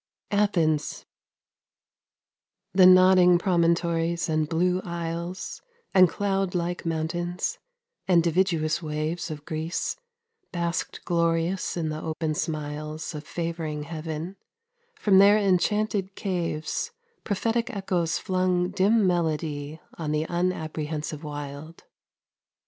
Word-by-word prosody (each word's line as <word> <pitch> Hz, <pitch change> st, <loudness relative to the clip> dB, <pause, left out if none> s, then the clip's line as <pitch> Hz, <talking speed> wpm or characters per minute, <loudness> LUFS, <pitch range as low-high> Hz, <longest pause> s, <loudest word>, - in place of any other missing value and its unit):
ATHENS 170 Hz, -8 st, +1 dB, 1.7 s
The 185 Hz, -1 st, +7 dB
nodding 185 Hz, -1 st, +7 dB
promontories 170 Hz, -1 st, +1 dB
and 155 Hz, -1 st, +1 dB
blue 180 Hz, +2 st, +1 dB
isles, 170 Hz, +1 st, -5 dB, 0.3 s
And 185 Hz, -3 st, +7 dB
cloud 195 Hz, -1 st, -1 dB
like 175 Hz, 0 st, -2 dB
mountains, 170 Hz, +2 st, -2 dB, 0.5 s
and 175 Hz, -3 st, +5 dB
dividuous 170 Hz, -2 st, +1 dB
waves 155 Hz, +2 st, -3 dB
Of 150 Hz, -1 st, -7 dB
Greece, 160 Hz, +2 st, -3 dB, 0.5 s
basked 170 Hz, -1 st, -3 dB
glorious 170 Hz, +2 st, 0 dB
in 160 Hz, -2 st, -1 dB
the 155 Hz, 0 st, -4 dB
open 160 Hz, 0 st, -2 dB
smiles 155 Hz, 0 st, -4 dB
Of 150 Hz, 0 st, -7 dB
favouring 165 Hz, -3 st, -3 dB
heaven: 160 Hz, +3 st, -5 dB, 0.6 s
from 195 Hz, -3 st, +4 dB
their 200 Hz, +2 st, +7 dB
enchanted 200 Hz, 0 st, +1 dB
caves 175 Hz, -, -2 dB, 0.3 s
Prophetic 230 Hz, +4 st, 0 dB
echoes 185 Hz, -7 st, -1 dB
flung 185 Hz, -1 st, 0 dB
dim 200 Hz, +2 st, +3 dB
melody 155 Hz, -3 st, -1 dB
5 -, -, -21 dB
On 150 Hz, -, -1 dB
the 155 Hz, +1 st, 0 dB
unapprehensive 160 Hz, -3 st, -2 dB
wild. 145 Hz, +2 st, -7 dB
170 Hz, 105 wpm, -26 LUFS, 155-185 Hz, 1.7 s, The